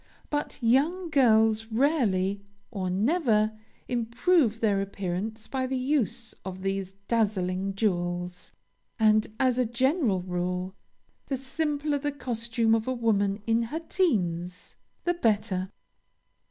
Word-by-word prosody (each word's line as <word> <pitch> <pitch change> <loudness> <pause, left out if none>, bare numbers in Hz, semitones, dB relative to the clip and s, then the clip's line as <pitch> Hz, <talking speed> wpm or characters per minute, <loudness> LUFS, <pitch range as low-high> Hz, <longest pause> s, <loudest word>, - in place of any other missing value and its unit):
But 295 0 -2
young 315 +9 +2
girls 225 -5 +4
rarely, 220 - +1 0.3
or 190 -5 -2
never, 215 - +2 0.4
improve 240 +1 +2
their 205 -3 +2
appearance 200 +3 -4
by 260 -1 -2
the 260 0 -1
use 250 -4 -1
of 185 0 -7
these 195 -1 -2
dazzling 195 -4 0
jewels; 180 -3 -2 0.5
and, 215 -1 +4
as 255 -1 +2
a 250 - +3
general 240 - +1
rule, 180 +1 -2 0.5
the 270 - -1
simpler 290 +2 -1
the 290 +1 -1
costume 230 -4 0
of 225 +1 +1
a 260 - +1
woman 205 -4 +1
in 230 0 +2
her 235 +8 -3
teens, 180 - -1 0.3
the 350 - +2
better. 205 - 0
225 Hz, 120 wpm, -27 LUFS, 195-260 Hz, 0.5 s, girls